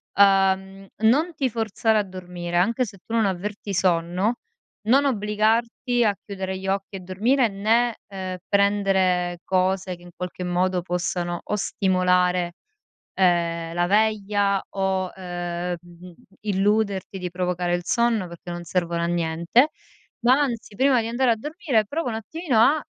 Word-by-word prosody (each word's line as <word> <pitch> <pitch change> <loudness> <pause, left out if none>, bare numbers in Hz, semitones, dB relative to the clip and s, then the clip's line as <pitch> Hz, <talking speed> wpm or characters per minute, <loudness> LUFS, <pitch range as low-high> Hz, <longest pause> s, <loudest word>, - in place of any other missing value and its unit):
Uhm, 195 0 +3 0.2
non 305 +9 +3
ti 270 -4 0
forzare 220 0 +1
a 210 - +1
dormire, 180 -2 -5
anche 230 +8 +2
se 200 -3 -11
tu 225 - -7
non 225 -3 +3
avverti 195 +2 -4
sonno, 180 +5 +1 0.5
non 265 +7 +4
obbligarti 230 +1 +1
a 205 -2 +2
chiudere 190 -2 -4
gli 190 0 -7
occhi 195 +1 -2
e - - -5
dormire, 225 +8 +2
né, 225 +4 +1
ehm, 185 -2 -5
prendere 190 -3 +2
cose 185 0 0
che 175 - -20
in 175 - -13
qualche 180 0 -5
modo 180 0 0
possano 175 0 -2
o - - -2
stimolare, 180 -3 +1 0.6
ehm, 170 -2 +1
la 175 0 +1
veglia 205 -1 +2
o, 190 -1 -1
uhm, 175 -1 -4
mhmm, 175 +1 -14 0.3
illuderti 200 -1 0
di 180 -1 -3
provocare 180 0 -1
il 175 0 -2
sonno 235 -3 +1
perché 170 0 -10
non 175 0 -5
servono 170 0 -1
a 170 - +1
niente, 170 - +2 0.5
ma 255 +3 +4
anzi 235 -7 -2
prima 265 0 +4
di 225 - -4
andare 240 +1 +2
a - - 0
dormire 290 - 0
prova 295 +8 -3
un 230 - -2
attimino 260 - -2
a 290 +7 +5
195 Hz, 150 wpm, -24 LUFS, 180-220 Hz, 0.6 s, a